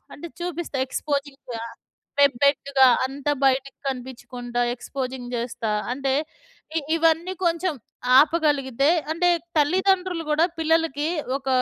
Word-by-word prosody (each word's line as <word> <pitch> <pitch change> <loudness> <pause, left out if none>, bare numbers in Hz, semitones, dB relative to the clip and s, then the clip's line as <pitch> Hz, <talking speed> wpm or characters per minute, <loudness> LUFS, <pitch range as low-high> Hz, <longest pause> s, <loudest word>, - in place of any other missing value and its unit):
అంటే 315 - -8
చూపిస్తా, 345 -4 -4
ఎ‌క్స్‌పోజింగ్‌గా 280 -4 -4 0.7
ఎబ్బెట్టుగా 280 0 +3 0.2
అంతా 280 +2 -2
బయటకి 270 +1 +1
కనిపించకుండా 245 -1 -5
ఎక్స్‌పోజింగ్ 255 -1 -5
చేస్తా, 230 -2 -3 0.2
అంటే 270 +1 -1 0.6
ఇ - - +4 0.2
ఇవన్నీ 330 +2 +2
కొంచెం 340 -1 +1 0.4
ఆపగలిగితే 285 -4 +3 0.2
అంటే 355 +2 +2 0.3
తల్లిదండ్రులు 365 +2 +2
కూడా, 310 +2 +4
పిల్లలకి 320 -2 +1 0.3
ఒక 270 -1 -7
280 Hz, 100 wpm, -24 LUFS, 260-325 Hz, 0.7 s, ఇ